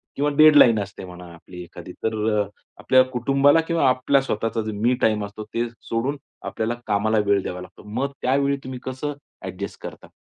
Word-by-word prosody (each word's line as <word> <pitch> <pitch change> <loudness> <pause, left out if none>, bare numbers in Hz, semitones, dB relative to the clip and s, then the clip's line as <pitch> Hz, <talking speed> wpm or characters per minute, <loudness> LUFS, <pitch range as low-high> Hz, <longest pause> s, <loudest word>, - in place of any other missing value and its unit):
किंवा 145 +1 +1
डेडलाईन 150 -7 +7
असते 100 -1 -6
म्हणा 90 0 -11
आपली 90 +2 -12
एखादी. 85 - -11
तर 110 0 0 0.2
अ, 100 - 0 0.3
आपल्या 130 -1 +5
कुटुंबाला 135 +5 +3
किंवा 165 -5 +2
आपल्या 130 +2 +2
स्वतःचा 115 -3 -2
मी 115 +5 +1
टाईम 105 -2 +2
असतो 100 +1 -8
ते 120 +1 0 0.2
सोडून, 125 +6 -1 0.3
आपल्याला 115 +2 -2
कामाला 110 +1 +1
वेळ 100 -1 +3
द्यावा 90 0 -5
लागतो. 90 - -13
मग 130 +6 -2
त्यावेळी 140 +2 +1
तुम्ही 130 -1 -7
कसं 130 +3 -4 0.3
ॲडजस्ट - - -7
करता? - - -9
120 Hz, 170 wpm, -23 LUFS, 105-135 Hz, 0.3 s, डेडलाईन